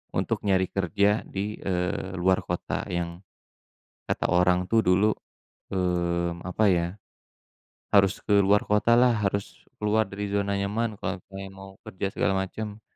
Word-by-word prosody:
untuk - - -1
nyari 95 -2 +3
kerja 100 +3 +2
di, 105 +2 -4
eee, 90 0 -2
luar 95 +1 +3
kota 90 - -3
yang 85 +1 -3 0.8
kata - - -1
orang 90 0 +3
tuh 115 - +3
dulu 95 +4 +4 0.7
mmm, 85 -2 0
apa 110 +4 +1
ya? 85 -1 +1 1.1
Harus 100 -1 +5
ke 105 - +1
luar 100 +1 +4
kota 105 +3 +3
lah, 125 0 +5
harus 100 0 0 0.3
keluar 105 -1 +1
dari 100 +1 -4
zona 100 0 0
nyaman 105 +4 -1
kalau 90 -1 -4
pengen 95 0 -8
mau 95 0 -11 0.2
kerja 95 +1 -3
segala 95 - 0
macam. 105 +2 -6
95 Hz, 145 wpm, -26 LUFS, 90-105 Hz, 1.1 s, Harus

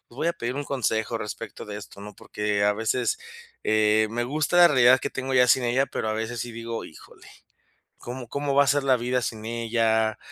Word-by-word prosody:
"Pues 120 - -18
voy 165 - -1
a - - +1
pedir 125 -3 -4
un 145 - -3
consejo 115 -4 -1
respecto 105 -1 -7
de 105 0 -7
esto", 100 -1 -12
¿no? 105 0 -10
Porque 105 -1 -2
a 105 - +4
veces, 115 - 0 0.5
eh, 110 0 +3
me 120 +1 -2
gusta 155 +6 -1
la 175 - +9
realidad 130 -2 +5
que - - -3
tengo 135 0 -4
ya 125 0 +5
sin 130 - +4
ella, 130 +3 +1
pero 110 - -4
a 110 - 0
veces 110 +1 -4
sí 120 - -5
digo: 115 0 -5
"Híjole, 80 - -15 0.7
¿cómo 125 0 -7
como 140 -1 -2
va 140 - +6
a - - -4
ser 145 0 +2
la 130 -2 +4
vida 125 +1 -1
sin 110 -2 -4
ella?". 110 -1 0
120 Hz, 220 wpm, -25 LUFS, 110-130 Hz, 0.7 s, la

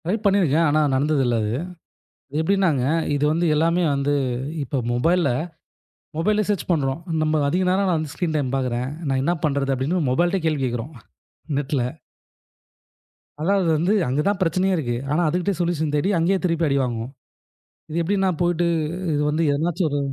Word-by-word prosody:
Try 180 +5 +1
பண்ணியிருக்கேன். 170 -6 +3
ஆனா, 155 +1 +3
நடந்ததில்ல 135 -3 +1
அது. 105 0 -1 0.9
எப்படின்னாங்க, 165 -5 +2 0.3
இது 145 - -1
வந்து 170 +2 +1
எல்லாமே 165 +3 +2
வந்து, 140 +1 0 0.5
இப்ப 135 0 -2
மொபைல்ல 165 +6 +2 0.9
மொபைல 210 +6 +1
சேர்ச் 205 -3 -1
பண்ணுறோம். 140 -3 0 0.2
நம்ம 155 0 +1
அதிக 180 +6 +1
நேரம் 190 +2 +2
நான் 175 - +2
வந்து 155 -2 -5
ஸ்கிரீன் 170 -3 -2
டைம் 135 -3 -1
பாக்கிறேன். 125 -1 -1 0.2
நான் 135 -1 +1
என்ன 170 +4 +2
பண்ணுறது? 140 -2 0
அப்படின்னு 145 +5 -1
மொபைலிட்டயே 175 +6 +1
கேள்வி 155 -3 0
கேக்குறோம் 120 +4 -3 0.6
நெட்ல. 140 -2 -1 1.6
அதாவது 190 +3 +1
வந்து, 175 +6 +1 0.2
அங்க 135 +4 0
தான் 200 -1 +1
பிரச்சனையே 185 +2 +1
இருக்கு. 120 -6 -2 0.2
ஆனா 155 +4 +2
அதுகிட்டேயே 180 +2 -1
சொல்யூஷன் 160 -3 -1
தேடி, 150 +7 +1
அங்கயே 175 +4 +2
திருப்பி 165 -2 +1
அடிவாங்குவோம். 125 -3 -1 0.8
இது 160 +2 -2
எப்படிண்ணா 190 +1 +1
போயிட்டு, 175 0 +1 0.5
இது 145 - 0
வந்து 155 +3 0
எதனாச்சும் 165 +3 0
ஒரு 145 - 0
155 Hz, 150 wpm, -22 LUFS, 140-175 Hz, 1.6 s, பண்ணியிருக்கேன்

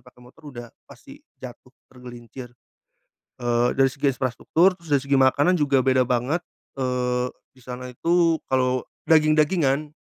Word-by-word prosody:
pakai 125 0 -19
motor 150 +5 -18
udah 120 -4 -9 0.2
pasti - - -15 0.2
jatuh - - -11 0.2
tergelincir. 125 0 -11 0.9
Eee, 120 0 +1
dari 135 0 +3
segi 140 +2 -5
infrastruktur, 160 +8 +1
terus 170 -3 -13
dari 140 -2 +3
segi 140 0 0
makanan 140 +7 +3
juga 140 -3 +2
beda 130 -1 +2
banget. 130 +8 -1 0.3
Eee, 125 -1 -1 0.2
di 130 - -21
sana 125 +1 -8
itu 165 +5 +1
kalau 130 -1 +1 0.3
daging-dagingan, 155 -2 +2
130 Hz, 140 wpm, -23 LUFS, 125-150 Hz, 0.9 s, dari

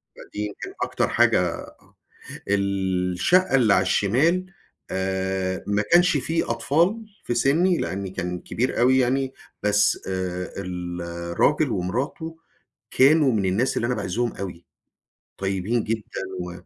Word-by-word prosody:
فدي 105 - -10
يمكن 105 - -7
أكتر - - 0
حاجة - - +4
آه. - - -10 0.5
الشقة 100 - +1
اللي 115 -6 +4
على - - +4
الشمال 160 - +2 0.5
آآ، 95 0 -2
ما 105 0 +1
كانش 175 +1 +5
في 165 +1 -1
أطفال 170 - +1 0.2
في 120 - -2
سِنِّي، 165 +9 +3
لأني 95 0 -3
كان 90 -1 -4
كبير 125 +3 -2
أوي 130 +2 +5
يعني، 130 +1 +1 0.3
بس 105 0 +3
آآ 90 -1 -3
الراجل 85 -2 -1
ومراته 150 - -3 0.5
كانوا 140 +1 +5
من 105 -3 0
الناس 105 +8 +1
اللي 120 - 0
أنا 125 - 0
باعزهم 110 +3 -2
أوي. 90 -3 -7 0.7
طيبين 95 +4 -1
جدًا 110 -3 -4 0.2
و 90 0 -5
105 Hz, 125 wpm, -24 LUFS, 95-135 Hz, 0.7 s, كانش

